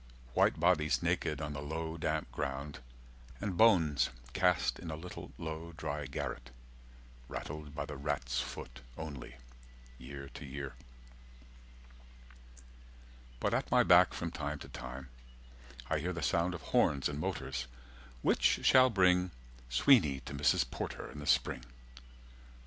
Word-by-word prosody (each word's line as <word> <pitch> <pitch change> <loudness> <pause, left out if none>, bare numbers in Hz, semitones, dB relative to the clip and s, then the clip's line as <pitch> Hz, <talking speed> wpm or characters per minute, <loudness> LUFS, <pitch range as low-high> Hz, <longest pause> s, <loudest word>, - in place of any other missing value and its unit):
White - - +3
bodies 75 -5 +3
naked 75 - 0
on 75 -1 -3
the 70 - -5
low 80 +2 -3
damp 80 - -2
ground 70 +1 -4 0.6
And 100 -3 -2
bones 85 -9 +5 0.2
cast 90 -1 +2
in 85 - -7
a 80 - -3
little 90 +3 -8
low 80 +1 -5
dry 75 -1 -3
garret, 60 -2 -4 0.8
Rattled 75 +2 -6
by - - -2
the 75 - -7
rat's 65 -3 -1
foot - - -7 0.2
only, 70 -6 -7 0.6
year 70 +2 -8
to - - -9
year. 70 -1 -6 2.7
But - - 0
at - - 0
my - - +5
back - - +6
from 85 -1 -3
time 75 -2 -3
to - - -10
time 65 +1 -7 0.8
I 80 +2 +1
hear 90 +4 -2
The 85 -2 -4
sound 85 +3 +1
of - - -8
horns 70 -3 +4
and 75 0 -4
motors, 60 -4 -3 0.6
which - - +3
shall 130 -1 +7
bring 90 -3 +4 0.4
Sweeney 70 - +5
to 65 - -8
Mrs. 70 -1 +2
Porter - - -5
in 75 - -9
the 75 - -7
spring. - - +2
75 Hz, 140 wpm, -33 LUFS, 70-85 Hz, 2.7 s, shall